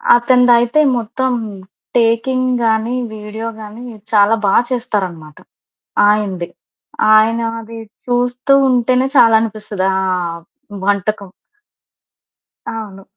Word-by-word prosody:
అతనిదయితే 240 +2 +3 0.2
మొత్తం 250 +3 -2 0.6
టేకింగ్ 245 +3 +1
గానీ, 225 +2 0 0.2
వీడియో 215 +1 -7
గానీ, 215 +3 -10 0.3
చాలా 210 +1 +4
బా 195 - +2 0.2
చేస్తారనమాట 190 - -4 0.7
ఆయనది. 195 -5 -1 0.7
ఆయనాది 230 +1 0 0.3
చూస్తూ 245 +2 +1
ఉంటేనే 255 +1 +2
చాలనిపిస్తది 220 -4 +2
ఆహ్, 180 -3 -2 0.4
వంటకం. 200 -1 -1 1.5
అవును. 200 -3 -8
225 Hz, 75 wpm, -16 LUFS, 205-245 Hz, 1.5 s, చాలా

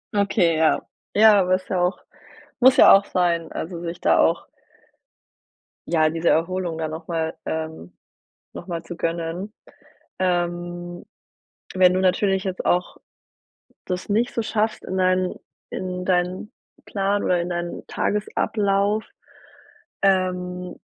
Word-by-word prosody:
Okay, 200 -5 +2
ja. 160 0 +3 0.4
Ja, 215 -1 +7
aber 185 -1 +3
ist 185 - -7
ja 185 -2 0
auch 180 +2 +1 0.6
muss 260 +1 +6
ja - - +9
auch 195 +1 +6
sein, 170 -2 0
also 170 +1 -5
sich 170 0 -6
da - - +3
auch - - +2 1.4
ja, 155 -2 +3
diese 165 +1 0
Erholung 170 0 0
dann 160 -1 -3
nochmal 160 0 -3
ähm, 160 - -5 0.6
nochmal 170 -3 -6
zu 175 - -8
gönnen. 170 +5 -3 0.7
Ähm, 175 -1 -2 0.7
wenn 185 -1 +5
du 185 - +1
natürlich 190 +1 +2
jetzt 190 -1 -4
auch 180 +1 0 0.9
das 180 +2 -4
nicht 225 +4 0
so 230 - 0
schaffst 215 0 -1
in 190 - -4
dein 185 0 +1 0.4
in 180 -1 -4
deinen 180 +2 -1 0.3
Plan 200 0 -1
oder 180 -1 +2
in 170 - -3
deinen 175 0 -4
Tagesablauf, 205 0 0 1.0
ähm, 180 -2 0
180 Hz, 125 wpm, -23 LUFS, 170-195 Hz, 1.4 s, ja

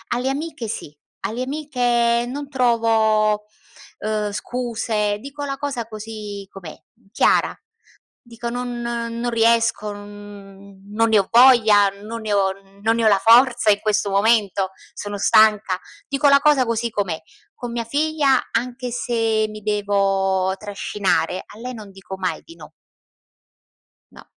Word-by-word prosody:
Alle 250 +2 -1
amiche 290 -3 -4
sì, 150 -8 -7 0.3
alle 235 +4 -3
amiche 245 -4 0
non 280 +3 -6
trovo, 225 -4 +2 0.6
uhm, 210 -1 -2
scuse 220 -2 -2
dico 280 +4 -7
la 275 -1 -4
cosa 270 -5 -4
così 215 -2 -8
com'è 180 -5 -10 0.4
chiara, - - +2 0.7
dico: 235 0 -7
"Non 245 0 -4
non 235 0 -3
riesco, 230 -2 +2
non 205 -1 -12 0.2
non 225 +2 +1
ne 220 - +5
ho 195 - 0
voglia, 225 -5 +6
non 225 +2 -7
ne 215 -1 -3
ho 195 -1 +2 0.3
non 225 +2 +2
ne 230 - 0
ho - - +6
la 200 -2 +4
forza 240 0 +5
in 205 - +2
questo 210 -1 0
momento, 200 -2 +2 0.2
sono 205 0 -6
stanca", 210 -2 +4 0.3
dico 280 +1 +2
la 280 0 +6
cosa 290 -3 +4
così 230 0 -1
com'è. 195 -7 -2 0.4
Con 245 -2 -6
mia 235 -1 -3
figlia, 285 +1 +2
anche 250 +1 -2
se 225 -2 0
mi 215 0 -10
devo 195 -2 +1
trascinare, 195 -4 -1
a 210 - -14
lei 250 +2 -6
non 215 -3 -10
dico 190 0 -10
mai 185 -1 -3
di 335 - -14
no. - - -13 1.4
No. - - -15
225 Hz, 145 wpm, -21 LUFS, 205-245 Hz, 1.4 s, voglia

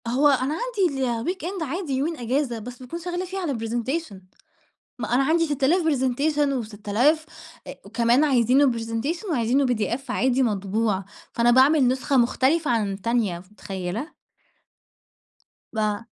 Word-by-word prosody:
هو 260 +5 +3
أنا 275 0 +2
عندي 370 - -1
الweekend 340 +10 -3
عادي 320 0 -3
يومين 300 +5 -1
إجازة، 245 0 -1
بس 245 +3 -9
باكون 295 +7 -6
شغّالة 355 +1 -4
فيه 380 +2 -5
على 340 -7 -2
presentation. 240 +4 -3 0.8
ما 230 0 -3
أنا 270 - +3
عندي 330 +4 +2
ست 290 -3 -3
آلاف 340 +7 +4
presentation 290 0 +1
وست 215 -4 -6
آلاف 295 +9 +3 0.4
أ - - -6
وكمان 240 +4 +2
عايزينه 260 0 +4
presentation 230 - -3
وعايزينه 255 0 +2
PDF 240 0 0
عادي 260 +1 +2
مطبوع، 205 -1 0 0.3
فأنا 235 +1 +3
باعمل 265 +2 +5
نسخة 265 +2 +1
مختلفة 265 +5 +2
عن 215 -4 0
التانية 205 -3 -1
ف 185 +3 -18
متخيّلة؟ 195 - -6 1.6
با 215 -1 -1
260 Hz, 140 wpm, -24 LUFS, 230-305 Hz, 1.6 s, باعمل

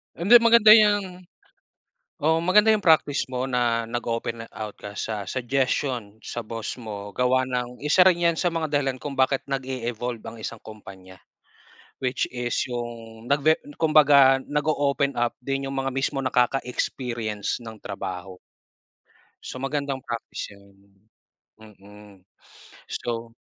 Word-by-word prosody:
Hindi, 215 +8 +7
maganda 230 -2 +7
yang, 205 -5 +4 1.0
oo 160 +1 +3
maganda 210 +5 +5
yung 215 - +2
practice 155 -6 +3
mo 130 0 -3
na, 120 -3 0
nag-open 115 -1 -4
out 105 -1 -7
ka 100 0 -9
sa 105 -4 -4
suggestion 130 -3 -1
sa 120 - -5
boss 115 +2 -6
mo 100 -2 -7
gawa 130 +1 +2
ng 125 -1 -3
isa 150 +5 +3
rin 175 -1 +1
yan - - -9
sa 175 - +2
mga 160 -3 -3
dahilan 135 -2 0
kung 140 +2 -6
bakit 135 0 +1
nag-e-evolve 125 -4 -4
ang 115 - -9
isang 115 - -5
kompanya, 95 -4 -12 0.8
which 130 0 0
is 120 -1 -2
yung 120 -1 -7
nag-ve 145 +2 +4 0.2
kumbaga 140 -4 +5
nag-o-open 145 -1 0
up 120 0 -1
din 135 +1 -3
yung 135 - -4
mga 135 -1 -2
mismong 135 0 -1
nakaka-experience 125 -3 -1
ng 110 -1 -9
trabaho. 95 -2 -6 1.1
So, 130 - -7
magandang 135 0 -2
practice 115 -3 -6
yun. 100 0 -20 0.9
Mm, 105 -2 -16 0.7
so. 115 -1 -5
125 Hz, 130 wpm, -24 LUFS, 115-145 Hz, 1.1 s, Hindi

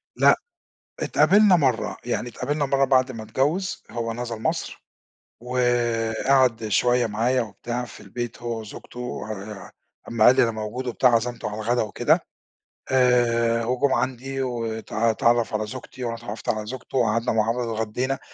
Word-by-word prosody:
لأ، - - +6 0.6
اتقابلنا 205 -1 +5
مرَّة، 130 -8 +1
يعني 120 0 -2
اتقابلنا 145 +5 -2
مرَّة 135 0 +2
بَعد 130 -1 +3
ما 115 -3 -7
اتجوّز، 150 - -1
هو 115 -1 -3
نزَل 115 -2 -5
مصر - - -3 0.6
وقعَد 120 0 +1
شوية 120 +3 +3
معايا 120 +4 +1
وبتاع 120 +3 -5
في 120 - -12
البيت 120 +4 -6
هو 115 -1 -3
وزوجته 125 +3 -7
آآ، 100 -1 -8 0.4
أمّا 115 -2 +2
قال 125 - +7
لي - - +5
أنا 115 - +3
موجود 110 +4 -5
وبتاع 125 +1 +3
عزَمته 120 +1 -1
على 105 - -6
الغدا 120 +3 +1
وكده 105 - +2 0.7
آآ، 115 -2 +3
وجُم 130 +3 +1
عَندي 135 +1 -2
وت 115 -4 -4
اتعرّف 115 +1 +2
على 110 0 0
زوجتي 130 +1 -8
وأنا 115 -1 -2
اتعرّفت 115 -1 -7
على 110 -1 -1
زوجته 125 +3 -6
وقعَدنا 115 0 +2
مع 110 0 +2
بعض 120 0 -2
اتغدّينا. 115 +5 -2
120 Hz, 150 wpm, -24 LUFS, 115-125 Hz, 0.7 s, قال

